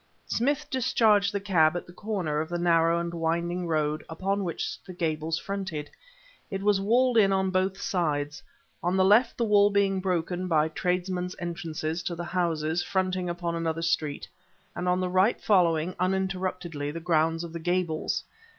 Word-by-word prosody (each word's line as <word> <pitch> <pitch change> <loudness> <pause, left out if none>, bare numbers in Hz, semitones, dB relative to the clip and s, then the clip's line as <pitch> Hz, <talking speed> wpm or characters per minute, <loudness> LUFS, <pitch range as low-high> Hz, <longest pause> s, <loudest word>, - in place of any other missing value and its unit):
Smith 285 +5 0
discharged 220 -6 +3
the 200 - -1
cab 175 -5 +3
at - - -6
the 175 - -14
corner 180 -7 -2
of 160 - -5
the 175 - -2
narrow 170 -1 +3
and 170 0 -3
winding 170 +2 -1
road 155 -1 0
upon 195 +5 -1
which 170 -3 -4
the 185 - -10
Gables 160 -1 -1
fronted. 190 -6 -5 0.6
It 195 0 -4
was 205 -1 +3
walled 240 +3 +3
in 195 -2 +4
on 190 -1 +1
both 190 +1 0
sides; 145 -6 -1 0.4
on 180 +2 0
the 190 - +4
left 225 +5 +4
the 235 - +1
wall 205 -1 +5
being 200 -1 +2
broken 180 0 -1
by 160 -2 +2
tradesmen's 180 +2 -2
entrances 165 -1 -4
to 175 - -3
the 175 - -5
houses 170 -2 0
fronting 185 -2 -1
upon 170 0 -3
another 165 0 -2
street, 155 -4 -1 0.5
and 180 +1 -1
on 180 0 +2
the 185 - 0
right 185 +5 +2
following, 175 -4 +2
uninterruptedly, 185 -5 -2
the 165 +3 -5
grounds 165 0 +1
of 170 -1 -8
the 170 - -4
Gables. 175 -2 -1
175 Hz, 170 wpm, -27 LUFS, 165-190 Hz, 0.6 s, wall